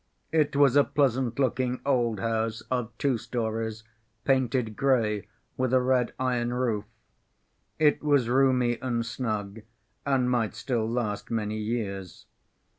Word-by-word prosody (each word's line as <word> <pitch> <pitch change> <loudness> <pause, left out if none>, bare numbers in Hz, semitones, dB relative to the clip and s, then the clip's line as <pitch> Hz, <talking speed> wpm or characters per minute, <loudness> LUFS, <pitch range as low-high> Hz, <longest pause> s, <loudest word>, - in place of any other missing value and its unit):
It 150 -3 +2
was 140 -2 +5
a 145 - +7
pleasant‐looking 130 -2 0
old 120 -6 +1
house 115 0 -1
of 125 -2 -1
two 135 -5 +1
stories, 115 -1 -3 0.4
painted 125 -4 +1
gray, 110 -7 +1 0.3
with 130 -1 0
a - - +6
red 125 -1 +2
iron 125 -2 0
roof. 115 -5 0 0.9
It 150 -1 +3
was 145 -5 +3
roomy 125 -2 +2
and 120 -3 -1
snug, 110 -3 -3 0.4
and 135 -3 +1
might 120 -3 0
still 115 -4 -1
last 115 -4 -2
many 110 -1 -2
years. 105 -5 -4
120 Hz, 125 wpm, -27 LUFS, 110-130 Hz, 0.9 s, a